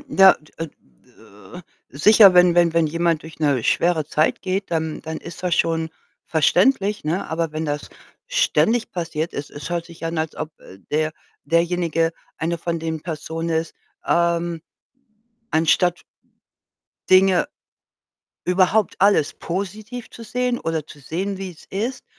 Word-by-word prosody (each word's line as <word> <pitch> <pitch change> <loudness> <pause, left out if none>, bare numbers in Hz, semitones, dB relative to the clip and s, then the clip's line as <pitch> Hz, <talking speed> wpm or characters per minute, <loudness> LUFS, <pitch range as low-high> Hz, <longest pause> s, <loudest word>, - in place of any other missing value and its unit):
Ja, 195 -5 +7
d 150 - -22
äh, - - -8 1.2
sicher, 200 - +7
wenn 180 -1 +6
wenn 175 -1 +4
wenn 165 -1 +3
jemand 165 0 0
durch 160 0 -12
’ne 140 -6 +2
schwere 170 -3 +2
Zeit 155 +1 +1
geht, 190 +1 -2
dann 160 -1 -2
dann 160 0 -5
ist 170 +1 -10
das 180 -2 +1
schon 165 -1 0 0.4
verständlich, 200 - +2
ne? 170 +5 -2
Aber 160 -1 -2
wenn 155 +1 -3
das 145 -1 -3 0.4
ständig 240 - +2
passiert 165 -2 -3
es 145 - -6
es 145 +3 -8
hört 170 -1 -2
sich 165 -1 -11
an, 165 0 -2
als 155 -1 -3
ob, 155 - -4
äh, 95 - -14
der 155 +1 0 0.3
derjenige 170 -1 +1 0.2
eine 170 +1 -2
von 170 0 -2
den 160 -1 -4
Personen 165 0 -4
ist, 160 0 -1 0.3
ähm 170 -1 +1 0.9
anstatt 165 +2 +2 1.1
Dinge 190 +8 +5 1.0
überhaupt 185 +3 +2
alles 195 -7 +3
positiv 210 +7 -5
zu 230 - -11
sehen, 250 +1 -1
oder 160 -2 -2
zu 150 - -14
sehen, 185 +8 -3
wie 190 -1 -6
es 160 - -17
ist, 235 +7 -3
170 Hz, 145 wpm, -22 LUFS, 160-190 Hz, 1.2 s, Ja